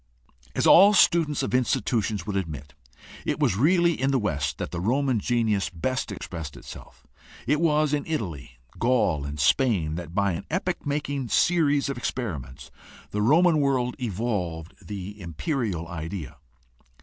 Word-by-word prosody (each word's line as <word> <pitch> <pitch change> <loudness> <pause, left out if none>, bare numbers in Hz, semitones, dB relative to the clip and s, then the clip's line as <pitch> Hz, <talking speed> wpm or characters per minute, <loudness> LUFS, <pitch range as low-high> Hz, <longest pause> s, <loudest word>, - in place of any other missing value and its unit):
As - - +1
all 200 +3 +8
students 165 -5 +3
of - - -3
institutions 110 -5 0
would 105 -1 -4
admit, 75 -7 -4 0.5
it - - -2
was - - +2
really 170 - +3
in 135 - +2
the 135 - +2
West 75 - -1
that - - -5
the 85 - -4
Roman 130 +3 +1
genius 110 -4 0
best 125 +8 -3
expressed 80 -6 -7
itself. - - -12 0.4
It 150 +6 +1
was 155 -2 +2
in 145 -1 -1
Italy, 85 - -4 0.2
Gaul, 110 - +1
and 70 +1 -6
Spain 80 - +2
that 85 -1 -7
by 100 -1 +2
an 85 - -5
epoch 180 -2 -2
making 140 -3 -2
series 145 -5 +2
of 140 -3 -4
experiments 70 - -5 0.4
the 105 - -1
Roman 155 +7 +4
world 130 -3 +1
evolved 95 -8 -3
the 100 0 -7
imperial 85 - -3
idea. 80 -2 -6
110 Hz, 150 wpm, -25 LUFS, 85-140 Hz, 0.5 s, all